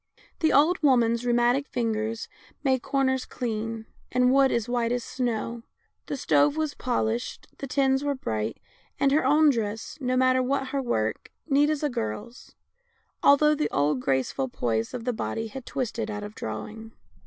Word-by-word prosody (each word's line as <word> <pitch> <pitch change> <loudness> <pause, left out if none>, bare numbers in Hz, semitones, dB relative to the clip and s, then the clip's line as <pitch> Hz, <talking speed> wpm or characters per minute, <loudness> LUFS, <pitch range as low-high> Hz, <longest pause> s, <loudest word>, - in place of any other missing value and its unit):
The 315 - +3
old 320 +6 +4
woman's 240 -4 +3
rheumatic 240 +4 +2
fingers 225 -1 -2 0.4
made 260 -3 +2
corners 265 -1 0
clean, 225 -1 -4 0.3
and 250 0 +3
wood 275 -1 +5
as 235 -1 0
white 240 -1 0
as 245 -1 -1
snow, 235 -2 -3 0.5
the 285 - -3
stove 290 +3 +3
was 310 -2 -1
polished, 240 -2 -2
the 275 - -5
tins 270 0 +2
were 285 -1 0
bright, 110 - -3 0.4
and 275 - +3
her 300 +3 +3
own 300 +3 +5
dress, 225 +3 -4
no 255 0 0
matter 255 0 +4
what 265 +1 -1
her 275 0 -1
work, 110 - -2 0.2
neat 290 0 +3
as 305 -1 -1
a 295 - +2
girl's, 170 - -5 0.7
although 300 +2 +5
the 300 0 -1
old 145 -1 +1
graceful 130 0 0
poise 115 -2 -2
of 235 -2 -6
the 250 - 0
body 225 0 -3
had 260 +3 -9
twisted 230 -3 -3
out 205 -1 -4
of 210 0 -7
drawing. 215 - -7
245 Hz, 165 wpm, -26 LUFS, 220-275 Hz, 0.7 s, wood